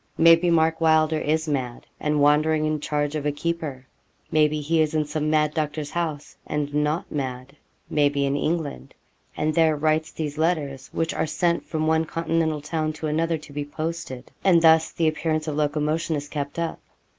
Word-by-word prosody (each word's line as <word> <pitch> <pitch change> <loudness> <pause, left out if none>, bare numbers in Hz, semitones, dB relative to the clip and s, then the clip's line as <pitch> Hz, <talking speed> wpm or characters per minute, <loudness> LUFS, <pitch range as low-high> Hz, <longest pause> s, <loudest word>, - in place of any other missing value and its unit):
'Maybe 165 +1 +6
Mark 160 -1 +2
Wylder 160 -1 +3
is 160 +2 0
mad, 130 -5 -3
and 150 0 0
wandering 155 +2 +3
in 155 0 0
charge 145 0 -1
of 155 -2 -2
a - - +2
keeper; 145 -3 -4 0.5
maybe 155 -1 +3
he 160 +2 +1
is 155 0 0
in 155 -1 +1
some 155 0 -2
mad 150 -1 +2
doctor's 150 -1 -3
house, 155 -3 -3
and 145 -1 -2
not 150 +2 0
mad; 130 -1 -4 0.3
maybe 145 -1 +2
in 140 0 0
England, 155 0 -3 0.4
and 155 +1 0
there 160 -2 +3
writes 155 +1 0
these 150 -1 -5
letters 145 -5 -1
which 165 0 -1
are 160 - -1
sent 170 +2 0
from 155 -2 -1
one 160 0 +2
continental 165 -2 -1
town 155 +1 -2
to 155 - -6
another 165 +2 0
to 150 -1 -13
be 145 0 -2
posted, 145 -4 -5
and 170 -3 +5
thus 160 0 +5
the 165 - 0
appearance 155 0 -1
of 150 - -2
locomotion 155 +2 0
is 145 0 -4
kept 145 0 -5
up. 170 -1 -2
155 Hz, 180 wpm, -24 LUFS, 145-160 Hz, 0.5 s, Maybe